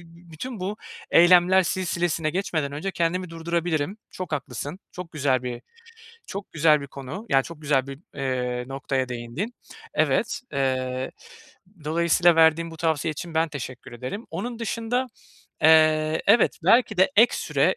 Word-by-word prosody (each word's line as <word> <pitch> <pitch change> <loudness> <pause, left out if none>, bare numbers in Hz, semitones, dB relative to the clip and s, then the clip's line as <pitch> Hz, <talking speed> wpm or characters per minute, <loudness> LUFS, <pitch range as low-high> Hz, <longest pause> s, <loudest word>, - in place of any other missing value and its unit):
bü 170 0 -18
bütün 225 +9 -7
bu 195 +3 -3 0.3
eylemler 180 +2 +6
silsilesine 170 -3 -1
geçmeden 160 -5 -2
önce 155 +7 -4
kendimi 180 +1 -1
durdurabilirim. 165 +1 -2
Çok 185 -2 -7
haklısın, 145 +3 -4
çok 180 -2 -8
güzel 140 -5 +1
bir 120 -1 -5 0.7
çok 200 +1 -7
güzel 155 -1 +4
bir 140 - -7
konu, 140 - -8
yani, 135 -5 +4
çok 165 -2 -10
güzel 140 -3 +1
bir, 135 -1 -8 0.2
eee, 125 -3 -2
noktaya 135 -1 -2
değindin. 125 - -5 0.4
Evet, - - +1
eee, 130 -1 -1 0.7
dolayısıyla 170 +2 +3
verdiğin 165 +1 +4
bu 165 - -10
tavsiye 160 -1 0
için 165 +2 -8
ben 160 +1 +2
teşekkür 130 -5 -8
ederim. 130 - -6
Onun 225 +8 -5
dışında, 230 +3 -1 0.6
eee, 155 0 +5
evet, 235 - +4
belki 220 +3 +4
de 190 +6 +4
ek 230 +3 +6
süre - - +1
160 Hz, 145 wpm, -25 LUFS, 140-180 Hz, 0.7 s, eylemler